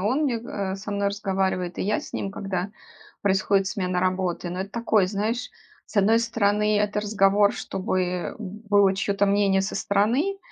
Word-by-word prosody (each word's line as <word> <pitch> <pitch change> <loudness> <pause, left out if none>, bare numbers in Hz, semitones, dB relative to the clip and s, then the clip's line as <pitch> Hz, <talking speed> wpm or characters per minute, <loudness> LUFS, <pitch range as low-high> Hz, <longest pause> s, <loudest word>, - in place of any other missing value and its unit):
он 255 +9 +1
мне, 245 -5 0
го 230 - -10
э, 195 -1 -3
со 205 +2 -7
мной 200 0 0
разговаривает, 190 -3 -2
и - - 0
я 210 +2 0
с - - -11
ним, 195 - -3
когда 195 -1 -3 0.5
происходит 195 0 +2
смена 185 -2 -1
работы. 185 -1 -1
Ну 180 - -5
это 195 +1 -5
такой 220 -4 +2
знаешь, 215 +5 -2 0.4
с - - -13
одной 210 +3 +5
стороны, 210 -2 +1
это 210 0 0
разговор, 205 -1 +3
чтобы 185 -2 -2
было 205 -1 +1
чьё-то 200 0 +1
мнение 200 -1 +3
со 195 - -3
стороны, 245 - +1
200 Hz, 170 wpm, -25 LUFS, 190-210 Hz, 0.5 s, одной